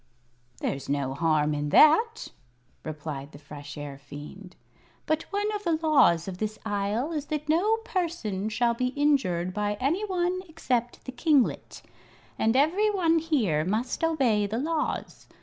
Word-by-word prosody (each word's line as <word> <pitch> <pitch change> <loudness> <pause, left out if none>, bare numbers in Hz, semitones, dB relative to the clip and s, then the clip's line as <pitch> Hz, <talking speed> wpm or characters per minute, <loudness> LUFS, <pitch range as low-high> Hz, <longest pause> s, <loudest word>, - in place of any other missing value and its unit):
"There's 140 0 -3
no 140 -2 -1
harm 150 0 +1
in 145 0 -2
that," 445 - +5 0.5
replied 150 -2 -6
the - - -10
Fresh 145 0 -10
Air 145 -2 -7
Fiend. 150 +7 -11 0.5
"But 310 0 0
one 410 +1 0
of 415 0 -4
the 340 -3 +1
laws 285 - +3
of 185 -1 -6
this 215 0 -3
Isle 210 +7 -1
is 300 -3 -3
that 300 -1 -3
no 375 +9 +3
person 230 - -2
shall 235 +2 +1
be 250 +2 -1
injured 185 -12 +1
by 210 0 -1
any 315 +11 0
one 365 -2 -1
except 250 -7 -2
the 260 - -5
kinglet. 270 0 +1 0.6
And 225 +2 +2
every 345 +10 +3
one 335 -5 +2
here 235 - +1
must 220 - -2
obey 255 -11 +2
the 215 +3 -3
laws. 310 +4 -3
240 Hz, 150 wpm, -27 LUFS, -, 0.6 s, that